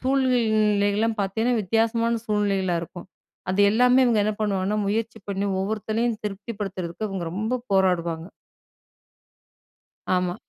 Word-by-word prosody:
சூழ்நிலைகளெல்லாம் 220 -5 +2
பாத்தீங்கன்னா 225 +4 0
வித்தியாசமான 230 +3 +1
சூழ்நிலைகளா 200 -4 +1
இருக்கும். 175 +2 -9 0.4
அது 190 +2 +1
எல்லாமே 250 +3 +4
இவங்க 235 -3 +3
என்ன 215 - +1
பண்ணுவாங்கன்னா, 200 0 0
முயற்சி 225 +2 -2
பண்ணி 200 0 -1
ஒவ்வொருத்தளையும் 220 +3 -1
திருப்திபடுத்துறதுக்கு 200 -2 -4
இவங்க 190 -3 -4
ரொம்ப 220 +6 -1
போராடுவாங்க. 170 -3 +1 1.9
ஆமா. 180 0 0
210 Hz, 105 wpm, -24 LUFS, 190-225 Hz, 1.9 s, எல்லாமே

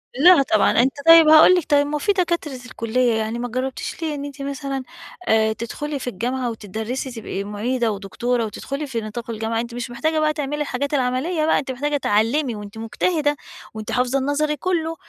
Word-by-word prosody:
لا، 335 +2 +7
طبعًا 215 -5 +3
أنت 265 +2 +1
طيب، 330 -1 +9
هاقول 315 +4 +8
لِك 355 - 0
طيب، 285 0 +4
ما 300 - -5
هو - - -1
في 410 - +1
دكاترة 340 -7 -1
الكلية 240 0 0
يعني 220 +2 -2
ما 245 - -2
جربتيش 255 +7 -4
ليه 310 -2 -2
إن 285 0 -5
أنت 285 0 -8
مثلًا، 275 -1 -4 0.4
آآ، 220 0 +3
تدخلي 280 +6 -5
في 245 - -4
الجامعة 245 +4 -2
وتدَرِّسي، 220 +5 -5
تبقي 215 -4 -5
مُعيدة 225 +3 -1
ودكتورة 230 +4 -2
وتدخلي 275 +7 -5
في 235 -4 -3
نطاق 230 +2 -7
الجامعة؟ 225 0 -2
أنتِ 235 0 -7
مش 245 0 -5
محتاجة 315 +6 0
بقى 305 0 +2
تعملي 295 0 -3
الحاجات 285 +1 -2
العملية 280 +5 0
بقى، - - +3
أنتِ 265 -1 -4
محتاجة 290 +3 -1
تعلِّمي، 235 +3 +1
وأنتِ 205 +1 -9
مجتهدة 290 +6 0 0.4
وأنتِ 220 +1 -6
حافظة 250 +3 +1
النظري 295 +2 0
كله، 330 0 -1
260 Hz, 190 wpm, -21 LUFS, 230-295 Hz, 0.4 s, طيب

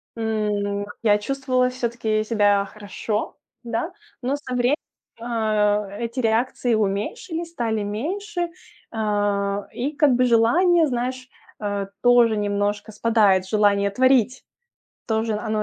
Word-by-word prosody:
м, 210 -2 -1 0.2
я 210 -2 +5
чувствовала 255 +1 0
всё-таки 235 -3 -1
себя 205 -2 +2
хорошо, 210 +1 -4 0.3
да, 235 +8 -3 0.3
но 260 +2 0
со 285 -3 -7
вре 250 +3 +3 0.4
а 210 -3 0
эти 235 +3 -4
реакции 235 +1 +1
уменьшились, 220 - -2
стали 230 -9 -2
меньше, 345 - -3 0.4
а, 205 -2 0
и 265 +5 -2
как 290 -2 +4
бы 250 +1 +3
желание, 320 +10 +4
знаешь, 255 0 -3 0.3
а, 205 -2 -2 0.2
тоже 240 -3 +5
немножко 205 +1 -1
спадает, 210 -4 +3
желание 200 -1 +3
творить, 255 +2 +2 0.6
тоже 220 0 0
оно 215 0 -1
225 Hz, 115 wpm, -23 LUFS, 205-250 Hz, 0.6 s, я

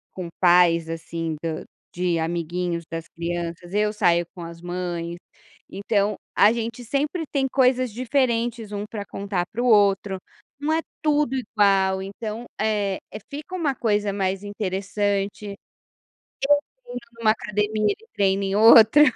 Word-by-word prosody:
com 180 -2 -5
pais 175 -2 +5
assim 165 -1 -4
do 160 -1 -3 0.3
de 175 -1 +1
amiguinhos 170 +1 -2
das 165 0 -5
crianças, 170 +1 -5
eu 210 +1 +1
saio 175 -4 +3
com 175 - -10
as 170 0 -9
mães, 175 -1 -4 0.5
então 200 0 0 0.2
a 210 - +6
gente 230 +1 -4
sempre 290 +7 -1
tem 270 -2 +1
coisas 255 -2 +2
diferentes 240 -3 0
um 205 0 -3
pra 205 -3 -5
contar 195 -4 -3
para 235 - -3
o 250 - +1
outro, 200 -3 +3 0.4
não 305 +2 0
é 325 - +1 0.2
tudo 295 -3 +2
igual 195 -5 +2
então, 215 +4 -6
eh, 210 -3 0 0.3
fica 295 +5 -7
uma 305 -7 0
coisa 210 -3 0
mais 195 0 -1
interessante. 200 0 -2
Eu 200 - -6 1.3
treino 245 0 -6 0.2
em - - -10
uma 215 - +5
academia 210 - 0
e 450 - -20
treino 195 0 +2
em 195 0 -1
outra. 225 +5 +8
205 Hz, 145 wpm, -24 LUFS, 180-230 Hz, 1.3 s, outra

